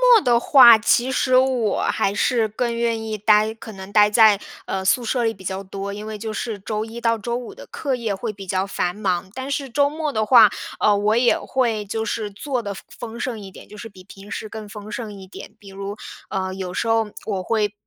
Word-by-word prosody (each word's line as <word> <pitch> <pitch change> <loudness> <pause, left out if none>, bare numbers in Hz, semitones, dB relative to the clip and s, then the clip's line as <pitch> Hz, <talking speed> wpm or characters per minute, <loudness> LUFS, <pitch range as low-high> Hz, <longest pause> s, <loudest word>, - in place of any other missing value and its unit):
末 440 - +5
的 240 -3 +4
话， 240 -3 +8
其 240 +3 +2
实 255 0 +2
我 255 -5 +2
还 195 - 0
是 230 +1 +1
更 235 +3 -2
愿 230 -1 -1
意 220 -1 -4
待 215 +1 +3
可 220 0 -11
能 190 0 -10
待 210 0 +5
在 215 -2 +5 0.3
呃 190 0 -3
宿 245 +6 +3
舍 240 +1 0
里 225 - +1
比 190 - -15
较 190 +1 -3
多， 195 +1 -6
因 210 +1 -7
为 215 -1 -5
就 220 +1 -5
是 215 0 -4
周 215 +2 -3
一 230 +1 -9
到 230 -1 +2
周 235 +2 -3
五 245 -1 -6
的 - - -12
课 275 -3 -3
业 230 -5 -2
会 215 +3 -4
比 195 -2 -11
较 185 +1 0
繁 180 -2 -2
忙。 190 -3 -2
但 260 +3 -5
是 280 -1 -2
周 285 +4 +2
末 305 -1 -3
的 215 -2 0
话， 220 -1 +8 0.3
呃 210 - +4
我 210 +2 +2
也 240 0 +3
会 235 -5 -1
就 220 +2 -3
是 215 -1 -3
做 255 +4 -3
得 200 -3 -5
丰 195 - -12 0.2
丰 230 +1 -9
盛 240 -2 -3
一 195 -1 -10
点， - - -14
就 210 - -13
是 225 +2 -8
比 190 -3 -15
平 200 +1 -13
时 215 - -5
更 215 0 -8
丰 210 -1 -9
盛 215 -1 -5
一 190 - -11
点。 185 - -11
比 200 - -16
如， 200 +1 -7 0.3
呃 190 -2 -3
有 185 -2 -5
时 230 - -2
候 225 -2 +1
我 195 -4 -2
会 210 -1 0
215 Hz, 260 characters per minute, -22 LUFS, 200-235 Hz, 0.3 s, 话